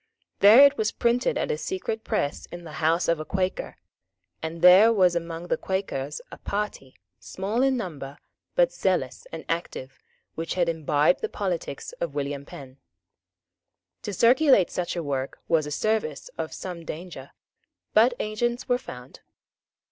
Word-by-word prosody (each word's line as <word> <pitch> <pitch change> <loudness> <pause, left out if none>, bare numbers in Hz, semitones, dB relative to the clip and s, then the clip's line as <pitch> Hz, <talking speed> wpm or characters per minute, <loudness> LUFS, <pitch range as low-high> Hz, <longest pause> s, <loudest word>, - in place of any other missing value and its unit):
There 225 +8 +9
it 280 0 +3
was 220 0 +1
printed 245 - +1
at - - -1
a 465 - -2
secret 225 -13 -4
press 145 - -2
in 175 0 -9
the 160 - -9
house 165 +3 +2
of 170 -1 +1
a - - -3
Quaker; 185 +2 -3 0.6
for 160 - -2
there 180 +7 +7
was 185 -5 +3
among 170 0 -4
the - - 0
Quakers 150 -7 -3
a - - -10
party, 200 -10 -4 0.2
small 205 +6 -3
in 265 -1 +3
number, 145 - -6 0.4
but - - +4
zealous - - -1
and - - -7
active, 135 -5 -4 0.3
which 165 +1 -4
had 175 -2 +1
imbibed 155 0 +2
the 445 - -2
politics 175 - -4
of 165 -4 -3
William 140 -1 -3
Penn. 135 -1 -11 1.2
To 205 - -5
circulate 240 - +4
such 180 0 -3
a 170 - -3
work 135 -2 -3
was 160 -3 +2
a - - -6
service 180 -3 -1
of 160 -1 -4
some 175 -3 -7
danger; 160 -5 -8 0.6
but 240 +3 +5
agents 240 +3 -2
were 245 -1 +2
found. 125 - -11
175 Hz, 155 wpm, -25 LUFS, 155-220 Hz, 1.2 s, There